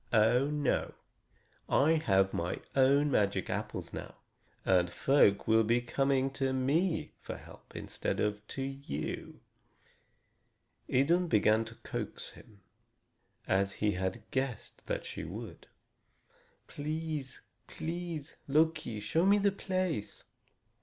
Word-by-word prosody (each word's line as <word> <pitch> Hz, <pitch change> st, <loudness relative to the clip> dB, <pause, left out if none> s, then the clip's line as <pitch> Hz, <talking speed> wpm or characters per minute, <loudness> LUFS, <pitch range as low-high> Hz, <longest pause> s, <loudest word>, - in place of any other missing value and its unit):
"Oh, 120 Hz, +4 st, +4 dB
no! 150 Hz, -3 st, 0 dB, 0.7 s
I 155 Hz, +3 st, +4 dB
have 95 Hz, -1 st, +4 dB
my 85 Hz, +1 st, -2 dB, 0.2 s
own 140 Hz, +2 st, +4 dB
magic 100 Hz, -5 st, +1 dB
apples -, -, -4 dB
now, -, -, -7 dB, 0.5 s
and 90 Hz, -2 st, +4 dB
folk 100 Hz, -1 st, +3 dB
will 110 Hz, 0 st, +5 dB
be 115 Hz, +3 st, +3 dB
coming 135 Hz, +2 st, +1 dB
to 135 Hz, -1 st, -1 dB
me 155 Hz, +7 st, +1 dB
for -, -, -6 dB
help -, -, -15 dB
instead -, -, -3 dB
of 105 Hz, 0 st, 0 dB
to 135 Hz, -, -4 dB
you." 135 Hz, -, -5 dB, 1.5 s
Idun 170 Hz, +8 st, +3 dB
began 110 Hz, -3 st, +3 dB
to 110 Hz, +1 st, -10 dB
coax -, -, -5 dB
him, 105 Hz, -3 st, -17 dB, 0.9 s
as 100 Hz, +1 st, +2 dB
he 105 Hz, 0 st, +1 dB
had 95 Hz, +3 st, -2 dB
guessed 130 Hz, -3 st, -3 dB
that -, -, -2 dB
she -, -, -6 dB
would: -, -, -8 dB, 1.0 s
"Please, 155 Hz, -2 st, -4 dB, 0.3 s
please, 165 Hz, -3 st, -5 dB
Loki, 155 Hz, -6 st, +2 dB
show 160 Hz, +11 st, +1 dB
me 200 Hz, +2 st, +6 dB
the 200 Hz, 0 st, +3 dB
place!" 185 Hz, -, -2 dB
135 Hz, 120 wpm, -32 LUFS, 105-155 Hz, 1.5 s, me